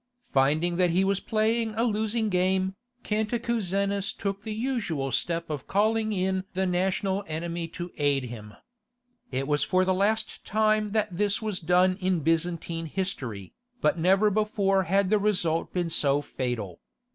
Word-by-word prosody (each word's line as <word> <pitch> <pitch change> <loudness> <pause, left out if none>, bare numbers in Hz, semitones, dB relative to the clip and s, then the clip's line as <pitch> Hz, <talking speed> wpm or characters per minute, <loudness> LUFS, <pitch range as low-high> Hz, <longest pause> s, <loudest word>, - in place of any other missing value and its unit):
Finding 155 +6 +2
that 180 -1 +3
he 180 +3 +2
was 195 0 +1
playing 220 +1 0
a 225 - +1
losing 220 0 0
game, 185 0 +1 0.3
Cantacuzenus 210 -3 -1
took 200 0 -3
the 220 - -6
usual 210 - -2
step 170 +6 -1
of 150 -3 -5
calling 220 +2 +2
in 190 -1 0
the 190 +1 +1
national 190 +2 0
enemy 165 +1 -3
to 175 +1 -7
aid 140 -2 +2
him. 110 -4 -8 0.8
It 135 +1 -2
was 145 -1 +1
for 185 +4 +2
the 185 - +2
last 215 +4 0
time 215 0 +1
that 215 -4 0
this 200 +1 +1
was 215 -4 -3
done 180 +2 +3
in 185 -2 +1
Byzantine 165 +1 -1
history, 130 - -4 0.3
but 165 -4 +2
never 195 +5 +4
before 200 -2 +1
had 195 0 +2
the 215 - +4
result 180 -6 0
been 175 -2 -1
so 145 -2 +2
fatal. 120 -11 -4
185 Hz, 155 wpm, -27 LUFS, 165-210 Hz, 0.8 s, never